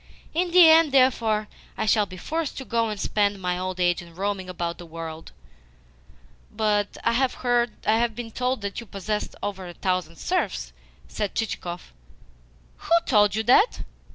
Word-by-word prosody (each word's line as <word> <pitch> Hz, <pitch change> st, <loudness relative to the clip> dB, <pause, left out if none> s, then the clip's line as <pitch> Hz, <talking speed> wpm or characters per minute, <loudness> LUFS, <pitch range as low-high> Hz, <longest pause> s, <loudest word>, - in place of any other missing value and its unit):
In 350 Hz, +3 st, 0 dB
the 350 Hz, -1 st, +8 dB
end, 320 Hz, -1 st, +6 dB
therefore, 230 Hz, -5 st, +3 dB, 0.3 s
I 220 Hz, -, -1 dB
shall 210 Hz, -1 st, +3 dB
be 185 Hz, -, -10 dB
forced 315 Hz, -, -3 dB
to 265 Hz, -, -6 dB
go 230 Hz, -2 st, 0 dB
and 210 Hz, -1 st, -5 dB
spend 205 Hz, -1 st, 0 dB
my 180 Hz, -1 st, -2 dB
old 185 Hz, 0 st, -4 dB
age 175 Hz, +1 st, +2 dB
in 170 Hz, -1 st, -14 dB
roaming 195 Hz, 0 st, -3 dB
about 170 Hz, -1 st, -4 dB
the 175 Hz, -, -9 dB
world." 165 Hz, 0 st, -8 dB, 1.2 s
"But 210 Hz, -1 st, 0 dB
I 230 Hz, -, +3 dB
have 240 Hz, -2 st, +1 dB
been 235 Hz, -1 st, -6 dB
told 250 Hz, +1 st, -1 dB
that 200 Hz, 0 st, -4 dB
you 235 Hz, -, -10 dB
possess 205 Hz, +2 st, -3 dB
over 190 Hz, -2 st, -4 dB
a 175 Hz, -, -10 dB
thousand 180 Hz, -2 st, -2 dB
serfs?" -, -, -2 dB, 0.3 s
said 210 Hz, -2 st, -4 dB
Chichikov. 180 Hz, -5 st, -4 dB, 0.8 s
"Who -, -, -12 dB
told 210 Hz, -4 st, +4 dB
you 220 Hz, -, 0 dB
that? 330 Hz, -, +4 dB
210 Hz, 160 wpm, -25 LUFS, 185-240 Hz, 1.2 s, the